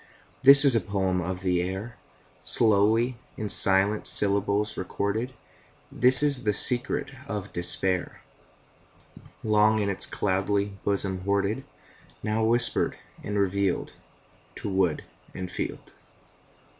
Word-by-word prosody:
This 140 +2 +9
is 135 - +6
the 115 - +5
poem 95 -3 -2
of 90 +1 -6
the 90 -2 0
air, 95 +6 -6 0.5
Slowly 110 +3 +1 0.2
in 105 -1 -5
silent 100 +2 +4
syllables 100 +1 0
recorded; 100 +6 -4 0.6
This 130 +3 +6
is 140 -4 +1
the 105 -1 0
secret 125 +4 0 0.2
of 105 -3 -7
despair, 90 +1 -1 1.2
Long 110 0 +2
in 100 -2 -2
its 95 - +4
cloudy 100 +1 -2
bosom 95 -2 -2
hoarded, 100 +5 -2 0.6
Now 110 +1 -2
whispered 120 +2 +1 0.3
and 105 0 -4
revealed 100 -1 -2 0.6
To - - -6
wood 95 -5 -1 0.3
and 90 -1 -7
field. - - -6
100 Hz, 115 wpm, -25 LUFS, 95-110 Hz, 1.2 s, This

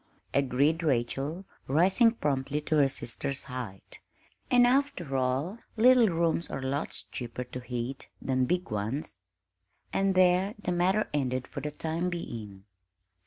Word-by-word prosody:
agreed 140 +4 +2
Rachel, 140 +5 -1 0.2
rising 185 - +5
promptly 140 - -1
to 155 +1 0
her 140 -2 +5
sister's 135 +2 -3
height; 125 -8 -8 0.5
"and, 245 -1 +6
after 245 - +1
all, 135 - 0 0.2
little 245 0 +6
rooms 170 0 +1
are - - -4
lots 135 +3 -2
cheaper 120 0 -6
to 125 +1 -7
heat 125 +2 -5
than 130 -1 +1
big 180 +3 -1
ones." 105 +3 -3 0.8
And 195 -1 +2
there 185 +2 +4
the 205 -4 -3
matter 185 +4 +2
ended 130 -3 0
for 140 - -6
the 150 - -3
time 160 +4 -2
being. 110 - -6
145 Hz, 135 wpm, -29 LUFS, 130-180 Hz, 0.8 s, and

